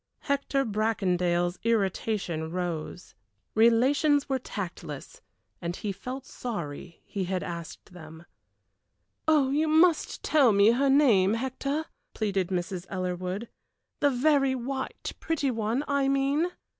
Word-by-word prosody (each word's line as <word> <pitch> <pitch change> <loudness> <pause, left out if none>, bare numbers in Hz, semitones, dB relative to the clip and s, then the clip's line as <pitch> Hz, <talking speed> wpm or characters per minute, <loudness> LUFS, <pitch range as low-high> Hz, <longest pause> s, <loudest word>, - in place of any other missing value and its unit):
Hector 280 -1 0
Bracondale's 180 -5 0
irritation 195 -6 0
rose. 175 -1 -4 0.4
Relations 270 +6 +4
were 265 -2 0
tactless, 170 - -7 0.4
and 175 0 -3
he 205 - -3
felt 250 +8 -7
sorry 170 - -6
he 195 -2 -3
had 185 0 -2
asked 170 +1 -8
them. 160 -1 -12 1.0
"You 300 0 +3
must 320 +1 +3
tell 275 -8 +4
me 200 +2 +6
her 270 +4 +2
name, 225 -8 +5
Hector," 275 +5 -2 0.3
pleaded 195 -4 0
Mrs. 180 0 -3
Ellerwood; 185 +3 -3 0.5
"the 285 - +4
very 275 0 +3
white, 265 +2 -4
pretty 295 -5 0
one 225 +4 -1
I 280 -1 +1
mean." 275 +4 +2
225 Hz, 115 wpm, -28 LUFS, 180-275 Hz, 1.0 s, me